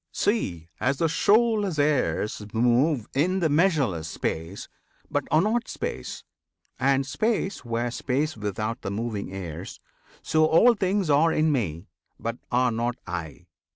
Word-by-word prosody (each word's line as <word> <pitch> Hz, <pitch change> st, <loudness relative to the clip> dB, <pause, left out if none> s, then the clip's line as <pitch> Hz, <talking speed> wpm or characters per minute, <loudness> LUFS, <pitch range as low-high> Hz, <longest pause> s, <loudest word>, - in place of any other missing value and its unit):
See! 90 Hz, -, -1 dB
as 130 Hz, +2 st, +1 dB
the 165 Hz, -, +2 dB
shoreless 205 Hz, +1 st, +2 dB
airs 145 Hz, -7 st, +1 dB
Move 120 Hz, +2 st, +2 dB
in 180 Hz, +7 st, +1 dB
the 165 Hz, -3 st, +2 dB
measureless 145 Hz, -, +2 dB
space, 80 Hz, +3 st, -4 dB, 0.4 s
but -, -, 0 dB
are 155 Hz, +3 st, +4 dB
not 230 Hz, +3 st, 0 dB
space, 475 Hz, 0 st, -5 dB, 0.6 s
[And 135 Hz, 0 st, +2 dB
space 210 Hz, -, -1 dB
were 120 Hz, 0 st, -2 dB
space 140 Hz, +5 st, -1 dB
without 110 Hz, +1 st, -3 dB
the 100 Hz, -, -4 dB
moving 105 Hz, -1 st, -3 dB
airs]; 90 Hz, -2 st, -7 dB, 0.4 s
So 155 Hz, 0 st, +3 dB
all 225 Hz, +10 st, +6 dB
things 195 Hz, -4 st, 0 dB
are 155 Hz, +3 st, +4 dB
in 155 Hz, 0 st, +2 dB
Me, 95 Hz, -, -2 dB, 0.3 s
but 115 Hz, +2 st, -4 dB
are 125 Hz, 0 st, +3 dB
not 120 Hz, +2 st, -1 dB
I. 85 Hz, -1 st, -6 dB
135 Hz, 140 wpm, -26 LUFS, 105-165 Hz, 0.6 s, all